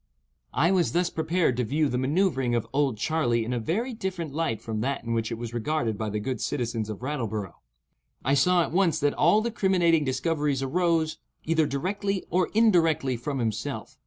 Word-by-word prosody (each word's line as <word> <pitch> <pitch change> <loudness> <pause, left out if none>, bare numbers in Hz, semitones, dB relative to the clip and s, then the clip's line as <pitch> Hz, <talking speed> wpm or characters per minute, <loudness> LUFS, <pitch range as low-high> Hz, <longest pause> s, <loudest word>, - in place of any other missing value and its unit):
I 165 +6 +3
was 180 -3 +2
thus 175 +1 +1
prepared 160 -5 0
to 125 - +1
view 150 +6 +1
the 125 -2 -1
manoeuvering 135 -3 +1
of 115 - 0
"Old 135 -5 +1
Charley" 120 -4 0
in 125 - -2
a 120 - 0
very 220 - -2
different 185 -8 -4
light 155 -8 -1
from 110 -1 -4
that 135 +4 -2
in 115 0 -2
which 115 0 -1
it 115 - -3
was 120 0 -6
regarded 120 -2 -1
by 110 +1 -3
the 105 +1 -2
good 130 +4 -3
citizens 115 -4 -2
of 110 +2 -6
Rattleborough. 110 - -3 0.7
I 135 - +3
saw 175 +5 +4
at - - -5
once 175 -2 +2
that 145 0 +2
all 175 +8 +4
the 235 +1 -2
criminating 175 -7 +3
discoveries 140 +1 0
arose, 160 +1 +1 0.3
either 160 -1 +2
directly 195 +7 -2
or 180 +1 +2
indirectly, 165 - +3
from 135 +4 -4
himself. 110 -3 -3
145 Hz, 190 wpm, -26 LUFS, 120-170 Hz, 0.7 s, saw